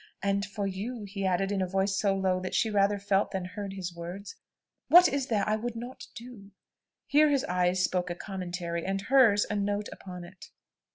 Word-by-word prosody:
And 200 0 +1
for 200 0 -4
you," 210 +5 -4
he 195 -1 -3
added, 190 +2 0
in 200 -1 0
a 185 - 0
voice 195 +1 0
so 195 0 +1
low, 190 -1 +1
that 185 0 -4
she 220 - +2
rather 205 0 +3
felt 200 0 +1
than 190 -2 -3
heard 195 +1 -6
his 180 -2 -5
words, 175 - -7 0.5
"what 355 +1 +8
is 275 -3 -1
there 210 -4 0
I 215 - +2
would 235 +2 -4
not 245 +3 -7
do?" 230 -4 -11 0.6
Here 300 +1 +4
his 280 -2 +2
eyes 180 0 +1
spoke 180 -1 0
a 175 - -3
commentary; 175 -3 -4
and 195 +1 -1
hers, 220 -2 +4
a 210 - -3
note 205 0 -1
upon 180 -2 -9
it. 180 +1 -13
195 Hz, 205 wpm, -29 LUFS, 185-210 Hz, 0.6 s, what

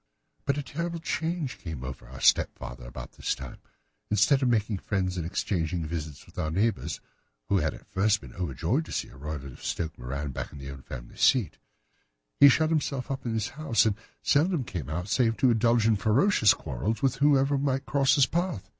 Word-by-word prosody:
"But 140 0 +1
a 145 - -2
terrible 170 +5 -3
change 160 -3 -2
came 80 -7 -6
over 65 -1 -7
our 65 +2 -10
stepfather - - +1
about - - -8
this - - -2
time. - - -9 0.5
Instead 105 +7 +4
of 130 - +2
making 110 -3 +1
friends 95 -2 -1
and 85 -2 -3
exchanging 85 -2 -1
visits 75 -3 -5
with - - -11
our 80 - 0
neighbours, 100 +6 0 0.5
who 100 - +3
had 75 -2 -1
at - - -15
first 105 +2 +2
been - - -12
overjoyed 90 - -1
to - - -10
see - - -2
a - - -15
Roylott 70 0 -6
of - - -14
Stoke 80 -2 -2
Moran 70 +4 -4
back - - -5
in - - -10
the 70 -1 -7
old 65 -1 -11
family - - -9
seat, 125 -8 +3 0.8
he 140 - +10
shut 155 +4 +3
himself 140 -4 -1
up 135 -2 -4
in 115 - -1
his 110 -2 -1
house 145 -7 +1
and 105 -3 +2 0.3
seldom 160 0 +3
came 80 - -5
out 90 +4 -3
save 115 +2 +2
to 130 - +4
indulge 115 0 +3
in 110 -1 +4
ferocious 110 - +4
quarrels 70 - -3
with 135 -1 +2
whoever 140 0 +4
might 135 -1 0
cross 140 -2 +3
his 140 -3 +6
path. 175 - -2
110 Hz, 200 wpm, -28 LUFS, -, 0.8 s, he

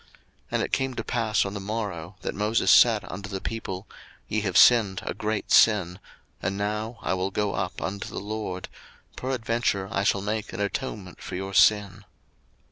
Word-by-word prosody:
02:032:030 - - -28 0.4
And - - +1
it - - -4
came 135 -1 0
to 115 - -3
pass 110 -3 +1
on 100 - -4
the 100 - -4
morrow, 100 -4 -4
that - - -2
Moses 105 +4 +2
said 110 -4 +6
unto 100 +2 -7
the 95 -1 -4
people, 95 -3 -5 0.4
Ye 110 - -1
have 95 -4 0
sinned 105 -6 +6
a - - -2
great 105 +1 -3
sin: 95 -5 +5 0.4
and 100 +1 -2
now 105 +3 -2
I - - 0
will 95 +1 -1
go 105 +1 -1
up 90 -1 -3
unto 100 +1 -4
the - - -5
LORD; 105 -3 -5 0.5
peradventure 115 -6 -1
I 100 - 0
shall 100 -1 +2
make 105 +1 -3
an - - -5
atonement 100 -2 -4
for - - -6
your 95 +1 -4
sin. 105 -1 +3
105 Hz, 185 wpm, -26 LUFS, 95-110 Hz, 0.5 s, said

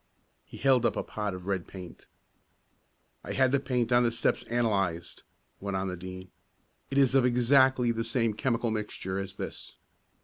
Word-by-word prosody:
He - - -12
held 130 -3 +3
up - - +2
a - - -2
pot 105 -3 -4
of 90 -1 -9
red 95 -3 -2
paint. 90 -3 -11 1.2
"I - - -5
had 130 -1 +3
the 140 - +3
paint 125 -3 -1
on 120 0 +5
the 120 -1 +2
steps 115 - +1
analyzed," 100 -8 -1 0.4
went 100 -1 -3
on 95 0 -2
the 90 - -4
Dean. 95 +1 -9 0.6
"It 135 - -2
is 135 -2 +4
of 135 -2 +5
exactly 125 0 +4
the 115 0 -2
same 115 -1 0
chemical 115 0 0
mixture 105 -3 -3
as 100 0 -6
this. - - -7
115 Hz, 175 wpm, -29 LUFS, 95-125 Hz, 1.2 s, on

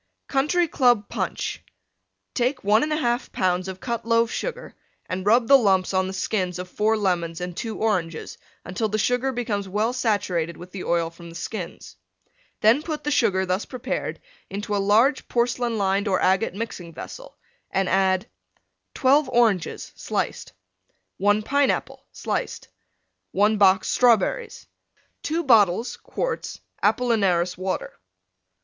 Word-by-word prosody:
COUNTRY 305 +6 +2
CLUB 245 -8 +2
PUNCH - - -3 0.7
Take 255 +2 0
1 210 +2 +4
1/2 250 -6 0
lbs. 185 0 0
of 190 0 -6
Cut 235 +1 -3
Loaf 230 0 +2
Sugar - - -5 0.3
and 185 +2 -4
rub 230 +2 +4
the 275 -1 +8
lumps 195 -4 +2
on 185 0 +2
the 190 - -5
skins 185 -2 -1
of 180 0 -5
4 215 +4 +1
Lemons 175 -5 -1
and 180 -1 -5
2 225 +3 -4
Oranges 180 -7 -2 0.3
until 185 +5 -2
the 215 - -1
Sugar 245 +5 +1
becomes 215 -6 -3
well 215 +5 0
saturated 185 -9 -1
with 180 +1 -11
the 190 - -6
oil 165 -1 0
from 170 0 -12
the 165 - -12
skins. 185 -1 -7 0.6
Then 225 +7 +5
put 310 -1 -5
the 295 - -1
Sugar 200 -9 +2
thus 185 +3 -1
prepared 255 +1 -4 0.3
into 205 +1 -3
a 200 - +1
large 225 +8 +3
porcelain 240 -1 0
lined 200 +1 +1
or 190 -2 +2
agate 190 +1 +2
Mixing 180 -7 -6
vessel, - - -9 0.3
and 195 -1 0
add: 190 0 +2 0.7
12 275 +1 +3
Oranges, 225 -8 +1
sliced. - - -3 0.6
1 205 +2 +2
Pineapple, 280 +4 0
sliced. - - -4 0.6
1 210 +2 +3
box 190 -1 +5
Strawberries. 250 - +2 0.6
2 330 +3 -1
bottles 225 - +4
(quarts) - - -4 0.2
Apollinaris 195 -8 +2
Water. 185 +1 -3
210 Hz, 140 wpm, -24 LUFS, 185-245 Hz, 0.7 s, the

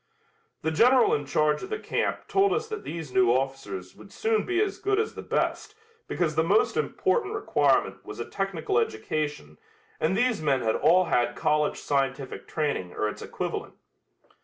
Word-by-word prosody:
The 160 - 0
General 245 +9 +5
in 145 -1 -1
charge 150 +1 +2
of 380 - -7
the 435 - -2
camp - - -2
told 395 0 +3
us 445 +1 -1
that 435 -1 -5
these 160 -6 -6
new 125 -2 +4
officers 125 -8 -2
would 200 - -15
soon 220 -1 0
be 365 -1 +1
as 410 -1 0
good 405 +1 +1
as 440 - -1
the - - -7
best 425 - -2 0.3
because 165 -3 0
the 160 - +2
most 200 +6 +2
important 415 +1 0
requirement 415 - +1
was - - -9
a - - -3
technical 190 -10 -1
education 110 - -3 0.4
and 175 +5 +1
these 245 -5 +1
men 140 -4 +2
had 110 -1 +1
all 170 +5 +4
had 120 -6 +1
college 150 0 +1
scientific 135 -1 -2
training 145 - -2
or 105 - -1
its 105 - -6
equivalent. - - -5
155 Hz, 175 wpm, -27 LUFS, -, 0.4 s, General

